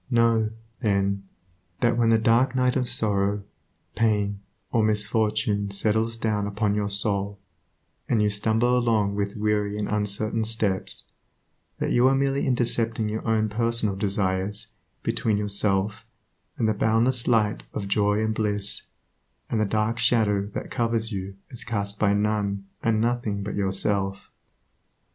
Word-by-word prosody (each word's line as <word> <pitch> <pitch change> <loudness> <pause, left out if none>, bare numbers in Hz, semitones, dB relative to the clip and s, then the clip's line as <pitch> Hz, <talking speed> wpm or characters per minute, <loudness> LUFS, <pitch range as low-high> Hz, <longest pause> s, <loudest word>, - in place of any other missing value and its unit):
Know, 115 -3 +3 0.3
then, 100 -3 0 0.5
that 120 -1 +3
when 115 -1 +2
the 115 - +5
dark 115 +4 +3
night 125 0 +2
of 125 -2 0
sorrow, 100 -3 +1 0.5
pain, 105 -3 +1 0.3
or 115 - +2
misfortune 105 0 +1
settles 110 +3 +1
down 105 -3 -1
upon 105 0 0
your 105 -1 -1
soul, 100 0 0 0.7
and 115 - +2
you 105 - +3
stumble 110 +4 +2
along 110 -5 +2
with 100 0 -2
weary 105 -1 0
and 105 - -2
uncertain 105 +2 +1
steps, 110 -4 -1 0.7
that - - -2
you 120 +1 +4
are 135 - +4
merely 135 +1 0
intercepting 115 -3 0
your 110 +1 -3
own 110 -1 +2
personal 115 -1 0
desires 100 +1 -1 0.3
between 110 -2 +1
yourself 100 -1 0 0.5
and 110 - +1
the 110 - +2
boundless 115 +4 +2
light 110 -3 +2
of 100 - -4
joy 105 +1 +2
and 110 - 0
bliss, 105 -2 -1 0.6
and 110 - +1
the - - +2
dark 110 +3 0
shadow 105 -4 +2
that - - -5
covers 115 -1 0
you 95 -1 -5 0.2
is 120 - -4
cast 100 -3 -3
by 105 -2 +3
none 100 -1 0 0.2
and 110 -2 +1
nothing 115 -3 -1
but 105 - -4
yourself. 95 0 -1
105 Hz, 145 wpm, -25 LUFS, 100-115 Hz, 0.7 s, the